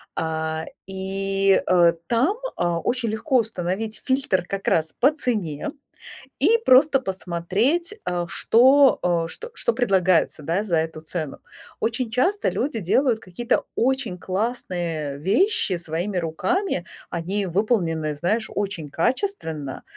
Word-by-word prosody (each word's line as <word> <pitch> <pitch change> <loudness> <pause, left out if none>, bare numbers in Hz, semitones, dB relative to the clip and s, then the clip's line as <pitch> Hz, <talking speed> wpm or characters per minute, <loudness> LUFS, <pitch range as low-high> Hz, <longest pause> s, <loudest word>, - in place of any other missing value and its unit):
А, 160 0 -2 0.2
и, 195 0 +1
э, 175 -2 +5
там, 265 - +2 0.2
а, 175 -1 0
очень 240 +4 -1
легко 220 +6 +1
установить 215 0 -3
фильтр 260 -10 +1
как 195 0 -5
раз 160 -1 +1
по 275 +4 +5
цене 215 - -2 0.7
и 460 - +5
просто 270 +2 +6
посмотреть, 195 - -1
а, 175 -1 -2
что, 265 +8 +5
э, 170 -2 +1
что 475 - -8
что 480 - +1
предлагается, 185 -8 +2
да, 170 +7 -1
за 175 -6 0
эту 160 0 -3
цену. 155 -3 -4 0.4
Очень 230 +1 -1
часто 360 - +1
люди 255 -3 -1
делают 225 +5 +2
какие-то 235 +7 -1
очень 245 -7 0
классные 175 - -3
вещи 205 - +2
своими 170 +4 -3
руками. 180 - -1 0.3
Они 190 +4 -2
выполнены, 170 -6 0
знаешь, 210 +9 0
очень 195 -7 -3
качественно. 165 - -2
195 Hz, 125 wpm, -23 LUFS, 170-245 Hz, 0.7 s, просто